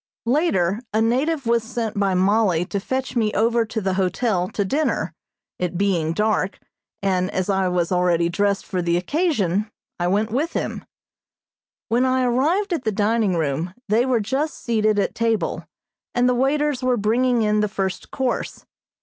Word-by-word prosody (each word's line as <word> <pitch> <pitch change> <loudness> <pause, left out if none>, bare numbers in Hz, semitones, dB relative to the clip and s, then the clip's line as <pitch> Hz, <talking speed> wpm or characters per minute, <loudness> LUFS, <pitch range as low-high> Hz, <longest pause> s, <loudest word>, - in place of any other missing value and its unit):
Later 230 - +1
a 215 - +1
native 265 +6 +1
was 235 0 +2
sent 225 -1 -3
by 200 -2 +1
Mollie 190 -2 +2
to 200 +1 -3
fetch 260 +6 -3
me 220 -3 +2
over 230 +2 +2
to 220 0 -3
the 190 -2 -1
hotel 190 0 0
to 205 - -1
dinner, 295 +10 0 0.5
it 180 -1 -2
being 180 -5 +1
dark, 210 0 0 0.5
and 185 -1 +1
as 185 +1 -1
I 190 -1 +1
was 180 -1 0
already 175 -2 +2
dressed 200 +3 0
for 185 -2 -2
the 170 0 +1
occasion, 210 - 0 0.3
I 175 - +1
went 210 +4 +1
with 290 +8 -1
him. - - -3 1.0
When 240 +2 +2
I 260 0 +2
arrived 315 +11 +1
at 320 - -2
the 220 - 0
dining 210 -1 +1
room 160 +3 -2
they 230 +5 +3
were 250 -3 +2
just 265 +9 -1
seated 215 -3 +1
at 200 - 0
table, 230 -2 -1 0.5
and 245 0 +3
the 250 - +3
waiters 275 +2 +1
were 255 -1 +1
bringing 235 +3 +2
in 210 0 +2
the 210 - +2
first 190 -3 -3
course. 260 -2 -3
215 Hz, 170 wpm, -22 LUFS, 190-250 Hz, 1.0 s, they